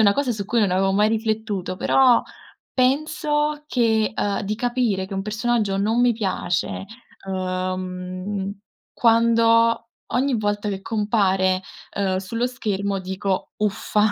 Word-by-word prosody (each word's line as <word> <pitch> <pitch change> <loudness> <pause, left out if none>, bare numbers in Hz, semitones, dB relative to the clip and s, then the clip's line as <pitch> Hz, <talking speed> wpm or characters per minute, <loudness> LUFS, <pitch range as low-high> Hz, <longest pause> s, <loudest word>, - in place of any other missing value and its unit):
una 200 - +6
cosa 265 -2 0
su 205 -2 -4
cui 235 +4 +1
non 205 -3 +2
avevo 195 +1 +2
mai 210 +2 +3
riflettuto, 220 -4 -2
però 255 +3 +4 0.5
penso 295 +2 +1
che, 225 -6 +2
uhm, 205 -1 0
di 205 +2 -2
capire 240 -5 0
che 195 - -8
un 195 - -1
personaggio 215 -1 0
non 220 +4 +1
mi 245 0 +5
piace, 190 -4 -2 0.4
uhm, 185 +1 -3 0.4
quando 230 0 +3 0.2
ogni 260 0 +1
volta 205 0 -1
che 195 -1 -4
compare, 195 -4 +1 0.3
ehm, 190 -2 0
sullo 230 +6 -2
schermo 200 -5 -2
dico: 190 +1 -3
"Uffa, 210 0 +1
210 Hz, 130 wpm, -23 LUFS, 195-230 Hz, 0.5 s, una